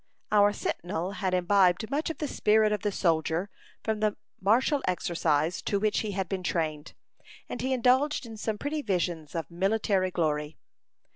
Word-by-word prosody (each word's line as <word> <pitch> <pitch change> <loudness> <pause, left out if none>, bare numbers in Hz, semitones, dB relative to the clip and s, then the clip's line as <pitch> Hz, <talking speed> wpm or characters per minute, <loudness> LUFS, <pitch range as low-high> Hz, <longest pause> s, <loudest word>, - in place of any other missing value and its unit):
Our 205 -1 +5
sentinel 175 -2 -3
had 190 -2 -1
imbibed 185 +2 +3
much 300 +4 0
of 325 - -4
the 300 - -2
spirit 215 -3 +3
of 210 - -1
the 205 - 0
soldier, 165 +1 0 0.3
from 220 -1 -1
the 215 -1 0 0.2
martial 250 +9 +3
exercise 170 -2 0
to 200 - 0
which 215 +1 +1
he 210 -2 -3
had 190 -1 -2
been 190 +1 -3
trained, 155 -4 -2 0.5
and 245 - -5
he 260 +1 -1
indulged 260 +3 +2
in 225 -1 -8
some 215 0 -3
pretty 295 +5 -2
visions 175 - -2
of 165 -2 -4
military 195 +1 +1
glory. 150 -3 -1
195 Hz, 165 wpm, -28 LUFS, 175-220 Hz, 0.5 s, Our